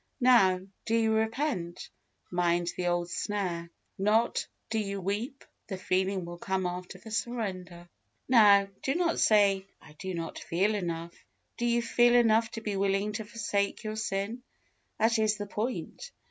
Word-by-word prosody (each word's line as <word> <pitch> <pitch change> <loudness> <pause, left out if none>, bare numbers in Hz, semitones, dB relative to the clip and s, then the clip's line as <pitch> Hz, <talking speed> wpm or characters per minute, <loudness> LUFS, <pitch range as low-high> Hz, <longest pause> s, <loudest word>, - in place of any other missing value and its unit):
Now, 235 -8 +5 0.3
do 225 - +2
you 225 -1 +3
repent? 220 - -2 0.4
Mind 175 -1 +1
the 180 - -2
old 175 0 0
snare. 180 -5 -2 0.3
Not, 215 +4 +2 0.2
do 225 - +1
you 200 -2 -3
weep? 210 +8 -3 0.2
The 190 - -4
feeling 185 0 0
will 175 0 -8
come 190 0 -1
after 180 +1 -5
the 220 +4 -12
surrender. 185 -7 -4 0.4
Now, 205 -5 +6
do 270 - 0
not 340 -1 +1
say, 200 -3 +4
"I 150 - -16
do 185 +4 -5
not 165 -1 -5
feel 195 +6 +1
enough." 170 -4 -3 0.4
Do 240 - 0
you 235 0 +2
feel 240 +1 +4
enough 225 -1 +4
to 225 - -5
be 210 -2 -3
willing 195 +1 +1
to 215 +1 -5
forsake 205 -2 -2
your 215 0 -3
sin? 215 +2 -2 0.6
that 225 0 +3
is 215 -1 +2
the 205 - -4
point. 235 - -4
200 Hz, 160 wpm, -29 LUFS, 185-225 Hz, 0.6 s, Now